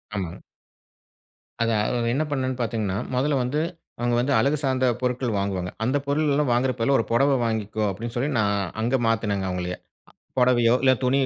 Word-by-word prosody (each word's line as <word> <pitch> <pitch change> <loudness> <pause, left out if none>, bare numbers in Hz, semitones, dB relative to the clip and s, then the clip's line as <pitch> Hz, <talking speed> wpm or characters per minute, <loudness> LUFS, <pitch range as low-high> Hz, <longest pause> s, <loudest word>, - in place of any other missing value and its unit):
ஆமா. 95 -5 -2 1.3
அதான். 115 -2 +2
அத 120 -1 -1
என்ன 150 - +1
பண்ணேன்னு 130 -2 -1
பாத்தீங்கன்னா, 110 -4 -1 0.2
மொதல்ல 140 +2 +1
வந்து 130 +5 -1 0.4
அவுங்க 120 0 +1
வந்து 135 +4 +1
அழகு 140 +6 +2
சார்ந்த 130 -1 +1 0.2
பொருட்கள் 125 -2 -1
வாங்குவாங்க. 95 -2 -2
அந்த 130 +5 +1
பொருள் 150 +2 +1
எல்லாம் 145 -2 +1
வாங்கிறப் 125 +1 +1
பதிலா, 135 +4 +3
ஒரு - - 0
புடவ 135 +4 +4
வாங்கிக்கோ! 110 -1 -2
அப்பிடின்னு 115 +5 -5
சொல்லி, 130 +4 0
நான் 100 -1 +2 0.3
அங்க 120 +4 +1
மாத்துனேங்க 105 -4 0
அவுங்கள 90 0 -3 0.6
புடவையோ 120 -2 +4
இல்ல 130 - +6
துணியு 135 +2 +3
120 Hz, 165 wpm, -24 LUFS, 110-130 Hz, 1.3 s, இல்ல